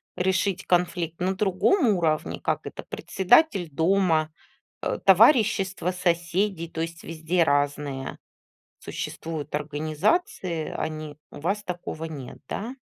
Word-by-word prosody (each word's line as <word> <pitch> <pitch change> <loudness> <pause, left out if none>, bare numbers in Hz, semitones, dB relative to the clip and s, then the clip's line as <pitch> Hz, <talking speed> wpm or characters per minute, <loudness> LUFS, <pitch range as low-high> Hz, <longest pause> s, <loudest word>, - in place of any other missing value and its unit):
решить 190 +1 0
конфликт 175 -2 0
на 185 +2 0
другом 210 - +2
уровне, 165 -6 0
как - - -1
это: - - -7
председатель 195 - +2
дома, 160 0 +2 0.5
э, - - -1
товарищества 195 - +4
соседей, 175 0 0
то 160 - -4
есть 165 0 -5
везде 165 +2 0
разные 145 -2 -1 0.6
существуют 160 -3 -5
организации. 155 - -1
Они 155 -1 -4
у - - -10
вас 195 +7 -1
такого 175 -2 -5
нет, 145 -6 -7
да? 230 +6 -4
175 Hz, 110 wpm, -25 LUFS, 155-190 Hz, 0.6 s, товарищества